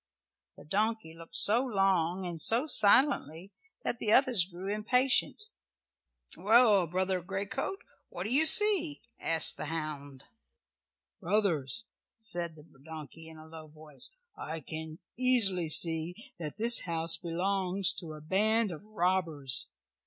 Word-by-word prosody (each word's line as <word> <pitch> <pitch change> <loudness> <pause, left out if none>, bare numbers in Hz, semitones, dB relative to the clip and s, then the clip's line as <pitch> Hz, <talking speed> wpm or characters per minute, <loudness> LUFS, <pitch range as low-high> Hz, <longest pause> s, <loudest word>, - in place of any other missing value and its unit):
The - - -14
donkey 210 0 -2
looked 165 0 -14
so 230 +5 +2
long 190 -6 0
and 170 -3 -6
so 235 - +2
silently 200 - +2 0.3
that 240 - -3
the 215 - -1
others 245 -8 +3
grew 190 +2 -6
impatient. 250 - +1 0.9
"Well, 210 -4 +3
Brother 185 +2 -2
Greycoat, 195 - -5 0.3
what 175 -1 -7
do 215 +5 -2
you 310 +4 +5
see?" 370 -7 +4 0.2
asked 165 -1 +3
the - - -6
hound. 145 -4 -6 1.0
"Brothers," 185 - 0 0.3
said 175 -7 -2
the 150 -1 -16 0.2
donkey 160 +1 -11
in 160 - -14
a 155 - -13
low 160 -1 -12
voice, 150 -2 -6 0.3
"I 160 +1 -7
can 155 +2 -8 0.2
easily 210 -10 +2
see 165 +5 0
that 155 +3 -7
this 235 +2 +5
house 165 -1 +1
belongs 185 +2 -1
to 160 -3 -9
a 155 - -11
band 210 +6 0
of 165 +2 -9
robbers. 175 -9 -1
185 Hz, 130 wpm, -29 LUFS, 160-220 Hz, 1.0 s, you